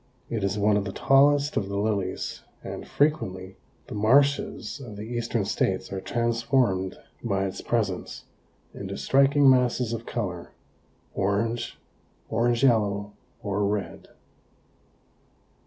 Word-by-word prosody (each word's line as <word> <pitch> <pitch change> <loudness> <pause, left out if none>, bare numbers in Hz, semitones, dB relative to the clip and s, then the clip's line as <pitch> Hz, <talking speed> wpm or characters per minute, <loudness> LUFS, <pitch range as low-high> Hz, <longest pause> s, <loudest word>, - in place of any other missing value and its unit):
It 110 -4 -2
is 100 +1 0
one 105 0 +3
of 100 - -1
the 100 - -3
tallest 140 +5 +3
of 100 -2 -1
the 100 - -3
lilies, 100 -3 -2 0.2
and - - -7
frequently 95 -11 0 0.3
the - - -9
marshes 125 +1 +2
of 110 -5 -9
the 105 - -7
eastern 115 -2 -2
states 95 -1 -1
are 95 - -3
transformed 115 -5 0 0.3
by 100 -4 0
its 95 - -5
presence 105 -6 -2 0.5
into - - -6
striking 140 +1 +4
masses 125 -2 +3
of 115 0 -5
color, 90 -7 -4 0.6
orange, 115 +5 -1 0.5
orange 120 +1 +1
yellow 105 -5 +2 0.3
or 100 0 -1
red. 100 0 -2
110 Hz, 125 wpm, -26 LUFS, 100-120 Hz, 0.6 s, striking